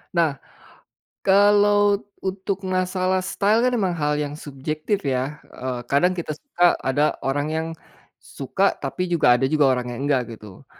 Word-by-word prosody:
Nah, 160 Hz, -5 st, +1 dB, 0.8 s
kalau 205 Hz, +1 st, +4 dB, 0.2 s
untuk 190 Hz, 0 st, -4 dB
masalah 185 Hz, 0 st, 0 dB
style 205 Hz, +4 st, +1 dB
kan 250 Hz, -, +3 dB
memang 190 Hz, -4 st, 0 dB
hal 150 Hz, -2 st, 0 dB
yang 145 Hz, -1 st, -3 dB
subjektif 155 Hz, +6 st, -3 dB
ya, 135 Hz, +3 st, -1 dB, 0.2 s
eee, 125 Hz, -1 st, -4 dB
kadang 175 Hz, +8 st, +2 dB
kita 155 Hz, -2 st, -3 dB
suka, 175 Hz, -, +2 dB
ada 145 Hz, +3 st, +1 dB
orang 145 Hz, +2 st, -1 dB
yang 160 Hz, 0 st, -1 dB, 0.5 s
suka, 190 Hz, +8 st, -1 dB
tapi 150 Hz, +6 st, -4 dB
juga 165 Hz, -8 st, +4 dB
ada 135 Hz, -, +1 dB
juga 145 Hz, -1 st, +3 dB
orang 125 Hz, -1 st, 0 dB
yang 120 Hz, -, -7 dB
enggak 125 Hz, -4 st, 0 dB
gitu. 105 Hz, -3 st, -14 dB
160 Hz, 150 wpm, -23 LUFS, 135-190 Hz, 0.8 s, kalau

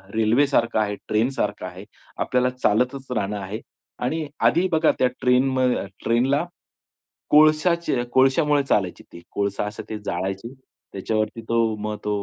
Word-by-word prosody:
रेल्वेसारखं 115 Hz, 0 st, +2 dB
आहे, 105 Hz, -1 st, 0 dB
ट्रेनसारखं 115 Hz, +5 st, -1 dB
आहे. -, -, -9 dB, 0.3 s
आपल्याला 125 Hz, 0 st, +1 dB
चालतच 125 Hz, +2 st, 0 dB
राहणं 105 Hz, -3 st, -1 dB
आहे. 100 Hz, +4 st, -6 dB, 0.4 s
आणि 150 Hz, +4 st, -2 dB, 0.2 s
आधी 180 Hz, +2 st, +4 dB
बघा 160 Hz, 0 st, +4 dB
त्या 130 Hz, -, +4 dB
ट्रेनम 130 Hz, +1 st, +2 dB
अ, 125 Hz, -5 st, +1 dB, 0.2 s
ट्रेनला, 135 Hz, +7 st, +2 dB, 0.8 s
कोळशाचे 155 Hz, -2 st, +4 dB
कोळशामुळे 140 Hz, +3 st, +3 dB
चालायची 95 Hz, -9 st, 0 dB
ती 85 Hz, -, -10 dB
कोळसा 100 Hz, 0 st, -1 dB
असं 105 Hz, 0 st, -6 dB
ते 110 Hz, -, -4 dB
जाळायची 95 Hz, +7 st, -3 dB, 0.4 s
त्याच्यावरती 110 Hz, +3 st, -2 dB
तो 115 Hz, -2 st, +2 dB
मग 105 Hz, 0 st, -2 dB
तो 105 Hz, -, -2 dB
125 Hz, 135 wpm, -23 LUFS, 105-135 Hz, 0.8 s, आधी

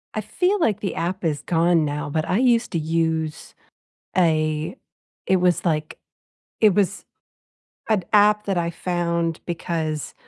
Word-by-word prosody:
I 215 Hz, -, -1 dB
feel 360 Hz, -, 0 dB
like 210 Hz, -6 st, +2 dB
the 200 Hz, -, -3 dB
app 185 Hz, +2 st, -3 dB
is 150 Hz, -3 st, 0 dB
gone 170 Hz, -1 st, +2 dB
now, 150 Hz, 0 st, -3 dB
but 155 Hz, +2 st, -1 dB
I 185 Hz, -, +1 dB
used 240 Hz, -2 st, +2 dB
to 170 Hz, -, -1 dB
use 160 Hz, -1 st, -2 dB, 0.6 s
a 155 Hz, -1 st, +1 dB, 0.5 s
it 190 Hz, -, +3 dB
was, 175 Hz, -1 st, +2 dB
like 155 Hz, -2 st, -1 dB, 0.6 s
it 210 Hz, -3 st, +6 dB
was 205 Hz, -1 st, 0 dB, 0.8 s
an 215 Hz, -4 st, +2 dB
app 210 Hz, 0 st, +4 dB
that 195 Hz, -, 0 dB
I 170 Hz, 0 st, -1 dB
found 170 Hz, -1 st, -2 dB
because 160 Hz, -3 st, -3 dB
170 Hz, 145 wpm, -23 LUFS, 160-200 Hz, 0.8 s, it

